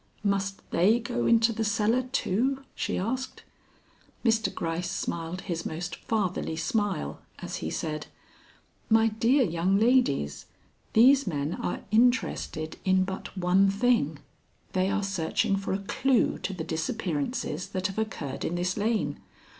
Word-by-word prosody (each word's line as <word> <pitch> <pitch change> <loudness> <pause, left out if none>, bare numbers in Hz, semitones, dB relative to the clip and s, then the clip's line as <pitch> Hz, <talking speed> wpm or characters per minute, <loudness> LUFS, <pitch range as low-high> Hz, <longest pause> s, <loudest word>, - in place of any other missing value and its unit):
"Must 195 -1 -1
they 205 +8 +4
go 120 - -2
into 230 0 +4
the 225 - -1
cellar 220 +3 +2
too?" 265 +3 0
she - - -2
asked. 255 +7 -3 0.8
Mr. 225 -1 +3
Gryce 170 +1 -3
smiled 170 -1 -3
his 170 -4 -3
most 170 +2 -4
fatherly 190 -7 -1
smile 205 - -1 0.2
as - - -5
he 80 - -4
said: 155 - -3 0.8
"My 225 0 +5
dear 235 +6 +3
young 180 0 +1
ladies, 220 - +2 0.5
these 265 +5 +6
men 145 -1 -1
are - - -3
interested 215 -9 +1
in 190 0 +3
but 190 +1 -6
one 185 +2 +4
thing; 200 - +2 0.6
they 185 0 +2
are 200 +1 0
searching 195 0 0
for 195 0 -3
a 190 - +1
clue 250 +5 +1
to - - -3
the 180 -4 -4
disappearances 165 - -2
that 185 -1 -4
have 195 +2 -1
occurred 165 -11 -4
in 175 - -1
this 180 +2 -1
lane. 215 +1 0
195 Hz, 140 wpm, -28 LUFS, 170-225 Hz, 0.8 s, these